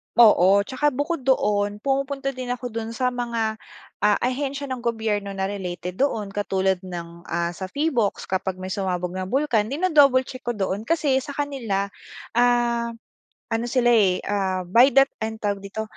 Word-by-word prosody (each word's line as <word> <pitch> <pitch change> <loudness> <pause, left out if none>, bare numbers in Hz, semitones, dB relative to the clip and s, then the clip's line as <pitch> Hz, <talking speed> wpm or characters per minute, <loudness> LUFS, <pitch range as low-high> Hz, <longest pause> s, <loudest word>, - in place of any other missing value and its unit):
Oo. 200 -4 +6
Tsaka 260 +5 0
bukod 290 -1 -2
doon, 205 -5 +2
pumupunta 275 0 -1
din 255 -1 -6
ako 245 -1 -4
dun 230 0 -5
sa 250 +1 +1
mga, 230 -3 -2 0.4
ah, 210 0 +4
ahensiya 275 +3 -1
ng 255 - -3
gobyerno 220 -4 -2
na 190 - -2
related 180 -1 -4
doon 220 -8 0
katulad 190 -2 0
ng, 170 -1 -8
ah, 170 0 -1
sa 185 +2 -6
Phivolcs 260 -4 0
kapag 190 0 -2
may 185 0 -7
sumabog 180 -2 -2
na 185 0 -4
bulkan, 245 -4 +1
dino-double 285 -3 +4
check 255 0 -9
ko 240 - 0
doon. 200 +2 -2
Kasi 300 -5 +2
sa 285 +1 -8
kanila, 230 -9 -2 0.4
ah, 240 -1 +2 0.6
ano 225 +1 0
sila 240 -1 +3
eh, 195 -5 +3
ah, 190 -2 -1
by 230 +9 +6
that 270 0 +6
time, 220 0 -3
anong 220 - -17
tawag 200 -1 0
dito, 220 +2 -4
225 Hz, 170 wpm, -23 LUFS, 195-260 Hz, 0.6 s, Oo